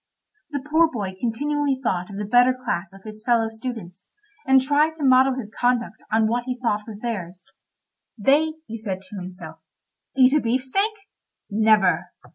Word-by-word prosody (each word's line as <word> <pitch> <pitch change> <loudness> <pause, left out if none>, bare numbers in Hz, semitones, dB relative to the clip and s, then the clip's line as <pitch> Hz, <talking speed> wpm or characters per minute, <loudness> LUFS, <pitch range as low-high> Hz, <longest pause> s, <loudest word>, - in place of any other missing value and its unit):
The 285 -3 -4
poor 320 +2 +4
boy 200 -6 -4
continually 280 +4 -1
thought 180 -5 -1
of 200 - -8
the 210 - -3
better 245 +4 +4
class 190 -8 -3
of 195 0 -16
his 215 0 -10
fellow 230 -3 +2
students, 220 -5 -8 0.4
and 265 0 +6
tried 295 +4 +2
to 310 - -6
model 260 0 +5
his 225 -4 -7
conduct 245 -3 0
on 220 0 +3
what 240 +2 -1
he 255 -1 -3
thought 215 -3 -1
was 215 -2 -9
theirs. 190 -5 -6 0.7
"They," 290 +8 +3
he 230 -4 -7
said 195 -3 -5
to 195 +2 -10
himself, 175 -3 -9 0.6
"eat 260 0 +6
a 300 - +4
beefsteak? 260 - 0 0.6
Never." 210 -4 +3
230 Hz, 165 wpm, -23 LUFS, 200-260 Hz, 0.7 s, and